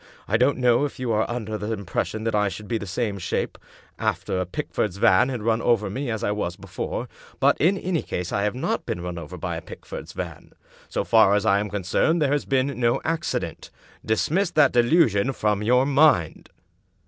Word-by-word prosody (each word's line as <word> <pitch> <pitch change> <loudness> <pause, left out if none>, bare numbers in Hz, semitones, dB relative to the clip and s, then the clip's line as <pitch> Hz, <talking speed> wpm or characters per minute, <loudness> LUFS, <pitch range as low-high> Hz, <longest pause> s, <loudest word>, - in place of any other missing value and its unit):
I 105 - +1
don't 125 +5 +3
know 125 0 +3
if 145 - -3
you 125 -2 -1
are 110 0 +1
under 110 -3 -4
the 105 +2 -3
impression 105 +2 -3
that 115 0 -1
I 105 -1 +2
should 100 +3 -8
be 115 +1 -1
the 100 - -7
same 100 +1 -2
shape 90 - -3 0.4
after 95 - -1
a 90 - -3
Pickford's 95 +1 -3
van 95 +5 +4
had 125 -5 -4
run 115 0 +1
over 105 -5 +1
me 130 +4 -3
as 110 -2 -3
I - - +1
was 105 -4 -2
before; - - -5 0.3
but, - - +4
in 185 +5 +4
any 180 -4 -1
case, 90 0 -4
I 100 - 0
have 105 +3 0
not 130 - -2
been 85 - -3
run 90 -1 -5
over 80 -3 -8
by - - -3
a - - -6
Pickford's - - -9
van. - - -7 0.4
So - - -1
far 110 -3 +5
as 105 +1 0
I 100 -2 +4
am 105 +1 -3
concerned 105 - +1
there 145 -3 +2
has 145 0 0
been 135 -1 0
no 120 -1 +2
accident. 165 +1 -3 0.3
Dismiss 165 - +1
that 150 -5 +4
delusion 120 - +3
from 105 -3 0
your 125 +4 +3
mind." 140 - +3
110 Hz, 205 wpm, -24 LUFS, 100-135 Hz, 0.4 s, far